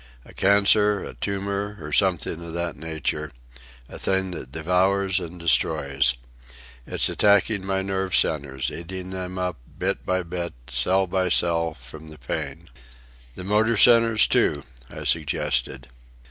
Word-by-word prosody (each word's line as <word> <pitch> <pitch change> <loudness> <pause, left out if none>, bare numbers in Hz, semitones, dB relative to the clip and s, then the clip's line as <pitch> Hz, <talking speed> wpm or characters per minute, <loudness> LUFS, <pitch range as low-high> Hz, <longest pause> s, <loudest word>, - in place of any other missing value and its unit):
A - - -15
cancer, 100 +1 +4
a - - -7
tumour, 100 +7 -3
or 75 -1 -8
something 90 -3 +1
of 85 -1 -8
that 85 -1 -3
nature,—a - - -6
thing 95 -1 0
that 65 -7 -8
devours 95 +4 +1
and 90 0 -8
destroys. 70 -6 +2 0.7
It's - - +1
attacking 100 0 +3
my 95 0 -1
nerve 95 -1 -1
centres, 70 -4 +1
eating 95 +2 -7
them 95 0 -5
up, 90 -3 -2 0.2
bit - - -2
by 95 0 0
bit, 85 0 -5 0.2
cell 90 +11 +1
by 95 0 0
cell—from 80 -4 -1
the 75 - -11
pain." 65 -3 -5 0.7
"The - - -7
motor 105 +4 +2
centres, 115 -1 +6
too," 70 -3 +1 0.3
I - - -8
suggested. 65 -5 -1
90 Hz, 130 wpm, -24 LUFS, 75-95 Hz, 0.7 s, centres